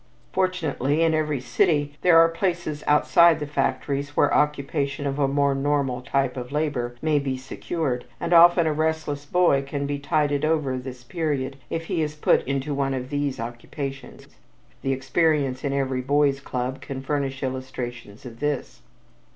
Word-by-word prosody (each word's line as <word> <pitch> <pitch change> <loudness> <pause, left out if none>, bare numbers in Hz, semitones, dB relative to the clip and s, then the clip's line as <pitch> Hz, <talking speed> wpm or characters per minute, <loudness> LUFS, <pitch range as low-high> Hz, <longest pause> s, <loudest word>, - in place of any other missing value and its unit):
Fortunately, 165 -5 0
in 165 -1 +3
every 155 -3 0
city 145 +3 +1
there 175 -2 +6
are 165 0 +8
places 165 -3 -2
outside 165 +2 +5
of 150 -1 -6
factories 140 +1 -1
where 145 - +4
occupation 140 -1 0
of 140 +1 -2
a 140 - +3
more 140 0 +2
normal 135 -2 0
type 135 0 0
of 125 0 -6
labor 140 -5 -1
may 155 -2 +3
be 135 -2 -2
secured, 130 0 -3
and - - -1
often 170 0 +7
a 155 - +1
restless 155 -2 -2
boy 175 -5 +3
can 140 +1 -4
be 145 0 -2
tided 145 -1 0
over 155 -4 +1
this 125 -1 -9
period 145 -4 -2
if 165 0 -3
he 165 - -1
is 150 -1 -2
put 150 - +3
into 140 +2 -1
one 135 -1 0
of 130 0 -5
these 145 -3 -1
occupations. 135 +4 -6 0.6
The 135 - -1
experience 135 0 +1
in 140 - -1
every 135 -2 -1
boys' 140 +1 +2
club 130 -1 -4
can 135 -1 -6
furnish 135 -1 -2
illustrations 125 -4 -6
of 115 -2 -10
this. 140 -4 -3
140 Hz, 165 wpm, -24 LUFS, 130-155 Hz, 0.6 s, are